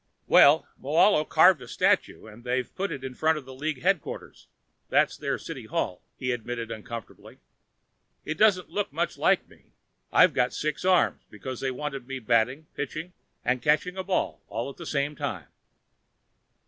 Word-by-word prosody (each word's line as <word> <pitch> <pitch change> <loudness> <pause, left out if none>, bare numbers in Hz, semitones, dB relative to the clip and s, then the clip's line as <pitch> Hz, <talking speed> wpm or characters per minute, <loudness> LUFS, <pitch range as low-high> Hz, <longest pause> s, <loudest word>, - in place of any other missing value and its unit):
"Well, 150 +3 +6 0.2
Moahlo 155 +4 +4
carved 170 -2 +6
a 125 - -10
statue - - +1
and 110 +2 -13
they've 125 +1 -2
put 195 +1 -3
it 135 - -6
in 130 -1 -5
front 160 +4 +2
of 140 -4 -9
league 135 +2 -4
headquarters 190 -3 -2 0.4
that's - - +3
their - - -2
city - - -8
hall," 90 -1 -2 0.2
he 130 -1 -2
admitted 120 -1 -4
uncomfortably. 115 +1 -9 0.9
"It 155 - -2
doesn't 200 -4 +3
look 205 0 -2
much - - -2
like - - +3
me. - - -23 0.4
I've 180 -4 +6
got 125 -2 +1
six 155 -1 -3
arms 185 -1 +3
because 125 +4 -7
they 135 - -1
wanted 135 -1 -5
me 135 0 -4
batting, 125 +5 +1
pitching 155 +5 -5 0.3
and 125 0 +1
catching 155 +7 +1
a 190 - -3
ball 185 -1 -1
all 115 +6 -4
at - - -17
the 170 - -8
same 145 +1 -1
time." - - -5
140 Hz, 165 wpm, -27 LUFS, 125-160 Hz, 0.9 s, Well